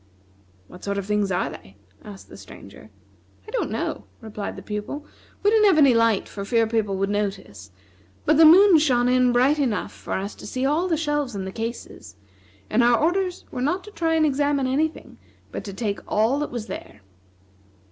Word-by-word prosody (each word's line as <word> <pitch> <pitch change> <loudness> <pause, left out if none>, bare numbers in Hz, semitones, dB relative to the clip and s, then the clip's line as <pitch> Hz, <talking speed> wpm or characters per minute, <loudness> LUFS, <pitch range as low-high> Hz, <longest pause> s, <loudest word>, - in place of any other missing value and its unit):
"What 180 - -14
sort 200 0 -2
of 200 - -3
things 210 -1 0
are 180 - -1
they," 95 +1 -13 0.3
asked 200 -2 -11
the - - -13
Stranger. 100 +2 -13 0.6
"I - - -9
don't - - -2
know," 105 - -4
replied 210 -2 -6
the - - -10
Pupil, 210 +8 -5 0.4
"we 410 - +4
didn't 435 -1 +4
have 380 - +4
any 280 -4 +6
light 230 -3 +2
for 200 - -7
fear 230 +2 +2
people 220 -3 -1
would 195 +1 -1
notice 195 - -4
it, 95 - -30 0.5
but 305 0 +3
the 325 - +7
moon 350 +2 +8
shone 250 -5 +2
in 250 0 +3
bright 260 +5 +3
enough 245 -7 -1
for - - -7
us 195 +2 -3
to - - -11
see 255 +1 -2
all 310 +6 +1
the 330 -3 0
shelves 295 -6 -2
and 190 -1 -4
the 190 - -5
cases; 225 - -7 0.5
and 235 +3 +2
our 240 0 +4
orders 360 +4 -1
were 250 - -5
not 345 +8 -1
to 420 - -12
try 330 -4 0
and 315 -1 +3
examine 285 -1 +1
any 275 +5 +2
thing, 315 - -15 0.3
but - - -6
to 200 - -6
take 205 -1 -3
all 225 +7 +1
that 295 - -3
was 240 -3 -5
there. 105 - -9
245 Hz, 205 wpm, -23 LUFS, 205-300 Hz, 0.6 s, moon